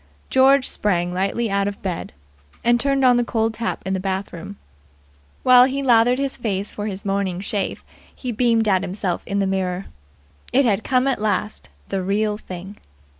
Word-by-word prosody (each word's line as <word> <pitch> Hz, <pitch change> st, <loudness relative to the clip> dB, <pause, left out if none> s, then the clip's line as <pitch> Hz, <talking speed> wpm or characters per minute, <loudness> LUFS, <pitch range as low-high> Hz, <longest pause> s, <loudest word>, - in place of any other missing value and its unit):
George 265 Hz, 0 st, +5 dB
sprang 175 Hz, -3 st, 0 dB
lightly 200 Hz, +4 st, -1 dB
out 200 Hz, 0 st, +1 dB
of 205 Hz, -, -5 dB
bed, 185 Hz, -3 st, -4 dB, 0.5 s
and 240 Hz, 0 st, +3 dB
turned 275 Hz, 0 st, +1 dB
on 250 Hz, -1 st, +6 dB
the 245 Hz, -, +2 dB
cold 225 Hz, -1 st, 0 dB
tap 230 Hz, +1 st, -3 dB
in 190 Hz, -, -1 dB
the 190 Hz, -, -1 dB
bath 190 Hz, +1 st, -3 dB
room. 195 Hz, +4 st, -8 dB, 0.9 s
While 250 Hz, -1 st, +8 dB
he 275 Hz, +1 st, -2 dB
lathered 245 Hz, -1 st, +4 dB
his 275 Hz, 0 st, -2 dB
face 205 Hz, -4 st, -2 dB
for 205 Hz, 0 st, -5 dB
its 195 Hz, -1 st, -6 dB
morning 195 Hz, -2 st, -1 dB
shave 200 Hz, 0 st, -3 dB, 0.3 s
he 250 Hz, -, -4 dB
beamed 230 Hz, -1 st, +2 dB
at 190 Hz, -3 st, +3 dB
himself 185 Hz, -1 st, -2 dB
in 200 Hz, -, -2 dB
the 200 Hz, -, +2 dB
mirror. 190 Hz, -1 st, -2 dB, 0.7 s
It 275 Hz, +2 st, +4 dB
had 215 Hz, -2 st, +1 dB
come 255 Hz, 0 st, +2 dB
at 265 Hz, -6 st, 0 dB
last. 215 Hz, -, -2 dB, 0.2 s
The 195 Hz, -, -1 dB
Real 210 Hz, +2 st, 0 dB
Thing. 185 Hz, +2 st, -9 dB
210 Hz, 180 wpm, -21 LUFS, 195-245 Hz, 0.9 s, While